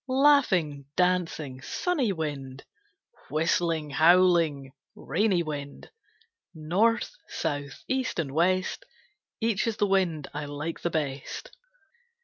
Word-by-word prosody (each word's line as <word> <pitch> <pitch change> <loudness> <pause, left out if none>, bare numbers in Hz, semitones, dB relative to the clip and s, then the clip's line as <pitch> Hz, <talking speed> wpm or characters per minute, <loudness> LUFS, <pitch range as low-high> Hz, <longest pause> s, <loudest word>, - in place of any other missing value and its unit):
Laughing, 255 - +3
dancing, 165 -7 0
sunny 285 - 0
wind, 140 -6 -5 0.6
Whistling, 160 0 0
howling, 165 -4 +4 0.2
rainy 180 +3 +1
wind, 145 -2 -7 0.6
North, 205 - +1 0.2
South, 145 -3 -4
East 260 -2 -1
and 155 -5 -2
West, 185 - +1 0.6
Each 225 -1 +1
is 225 - -1
the 205 - +2
wind 185 -7 +1
I 150 +1 -4
like 145 +3 -5
the 170 - -1
best. 150 - -4
165 Hz, 105 wpm, -27 LUFS, 145-195 Hz, 0.6 s, howling